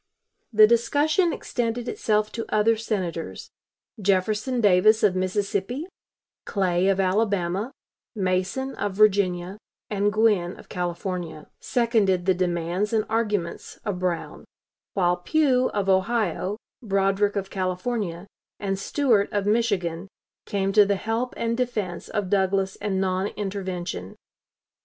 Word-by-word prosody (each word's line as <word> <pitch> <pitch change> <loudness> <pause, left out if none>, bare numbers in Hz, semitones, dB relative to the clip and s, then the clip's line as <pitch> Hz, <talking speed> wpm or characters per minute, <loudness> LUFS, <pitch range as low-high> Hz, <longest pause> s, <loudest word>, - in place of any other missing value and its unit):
The 215 -1 +8
discussion 290 - +2
extended 240 -3 -3
itself 215 -2 0
to 230 - -5
other 215 +2 +3
Senators; 190 -7 -4 0.5
Jefferson 210 +6 +1
Davis, 210 +1 +5
of 200 -3 +4
Mississippi, 200 - -1 0.6
Clay, 185 -2 +1
of 195 -1 +2
Alabama, 195 +2 0 0.4
Mason, 190 +7 -1
of 205 -2 -2
Virginia, 195 -2 +2 0.3
and 205 0 +1
Gwin, 205 -5 +2
of - - -15
California, 175 -2 -4
seconded 220 -7 +1
the 190 - +4
demands 180 +3 -1
and 215 -1 +2
arguments 210 -6 -2
of 200 -4 -2
Brown; 180 -2 -3 0.5
while 180 -2 +2
Pugh, 255 - +2
of 200 -2 -2
Ohio, 200 +1 +1 0.2
Broderick, 195 -1 +1
of 195 -1 -3
California, 185 -1 -2 0.3
and 195 -1 -2
Stuart, 225 -2 +2
of 205 -1 -1
Michigan, 200 -6 0 0.4
came 195 -1 -1
to 210 0 +7
the 200 0 +1
help 225 +5 -2
and 230 0 0
defense 215 -8 -3
of 200 -3 -2
Douglas 190 -1 +1
and 195 -2 -2
non 190 0 0
intervention. 185 - -5
200 Hz, 120 wpm, -25 LUFS, 185-220 Hz, 0.6 s, The